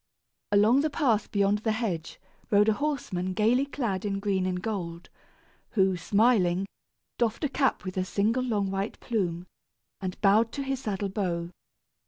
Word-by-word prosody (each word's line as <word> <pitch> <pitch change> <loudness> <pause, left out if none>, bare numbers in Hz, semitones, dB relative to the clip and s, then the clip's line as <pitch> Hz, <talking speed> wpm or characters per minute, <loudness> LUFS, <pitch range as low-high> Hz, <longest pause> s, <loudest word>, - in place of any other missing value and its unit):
Along 210 +6 +5
the 310 - +1
path 260 -8 +1
beyond 200 0 +2
the 220 0 0
hedge 190 -8 -3 0.3
rode 210 +1 +4
a - - +4
horseman 210 -10 -2
gayly 235 +8 +2
clad 230 -10 -2
in 200 -1 -1
green 195 -2 0
and 180 -1 -1
gold, 180 -5 -5 0.6
who, 190 -3 +3
smiling, 195 -1 +2 0.5
doffed 235 +4 0
a 295 - +1
cap 270 -5 0
with 185 0 -5
a 185 - +2
single 210 +6 +1
long 210 -6 0
white 195 +2 -3
plume, 180 -6 -2 0.5
and 185 -1 -5
bowed 215 +3 +4
to 280 - -3
his 270 -1 -2
saddle 205 -5 -2
bow. 175 -4 -2
205 Hz, 160 wpm, -28 LUFS, 185-230 Hz, 0.6 s, Along